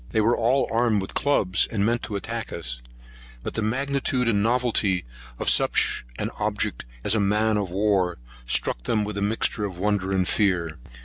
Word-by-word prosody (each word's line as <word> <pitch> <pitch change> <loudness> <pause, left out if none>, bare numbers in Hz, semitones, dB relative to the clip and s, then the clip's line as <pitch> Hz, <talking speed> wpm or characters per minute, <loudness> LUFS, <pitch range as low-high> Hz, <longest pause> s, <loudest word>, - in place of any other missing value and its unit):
They - - 0
were 115 +3 +3
all 125 +4 +2
armed 115 -2 +2
with 95 - -5
clubs, 100 -10 +2
and 100 -3 0
meant 120 +1 +1
to 105 - -5
attack 115 +2 -4
us; 65 -8 -5 0.6
but - - -4
the - - -2
magnitude 130 +2 0
and 105 -3 +2
novelty 115 - +1 0.3
of - - -4
such - - +3
an - - -2
object - - -1 0.2
as 105 - +3
a 110 - +2
man 105 +2 +2
of 100 -3 -1
war, 95 -2 +1 0.3
struck - - 0
them 110 -2 +1
with 105 0 -4
a 100 - -3
mixture 105 +1 0
of 95 -4 -4
wonder 100 0 0
and 95 -1 +1
fear. 85 - +1
105 Hz, 185 wpm, -25 LUFS, 95-115 Hz, 0.6 s, were